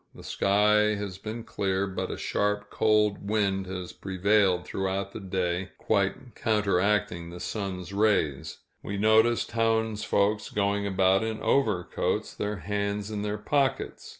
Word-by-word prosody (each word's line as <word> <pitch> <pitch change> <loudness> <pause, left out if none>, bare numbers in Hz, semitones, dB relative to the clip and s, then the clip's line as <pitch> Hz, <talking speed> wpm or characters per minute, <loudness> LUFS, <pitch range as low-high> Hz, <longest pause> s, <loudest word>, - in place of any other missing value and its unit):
The - - -12
sky 105 +2 +3
has 100 -2 -5
been 110 +3 -6
clear, 95 -3 -1
but 95 -1 -4
a - - -4
sharp, 105 0 -1
cold 105 -2 +2
wind 100 -3 0
has 90 -1 -6
prevailed 95 -1 +1
throughout 95 +1 -2
the - - -6
day, 95 -1 -2
quite 105 +4 -1
counteracting 100 -5 +1
the 90 +1 -9
sun's 95 -1 -4
rays; 100 -10 +1 0.2
we 100 - -4
noticed 110 +3 +3
townsfolk 110 -2 +1
going 100 0 +1
about 95 +1 +3
in 110 -1 -3
overcoats, 105 -10 0
their 105 +1 -3
hands 100 +1 -3
in 105 -1 -3
their 105 0 -2
pockets. 135 +4 -1
100 Hz, 135 wpm, -27 LUFS, 95-105 Hz, 0.2 s, sky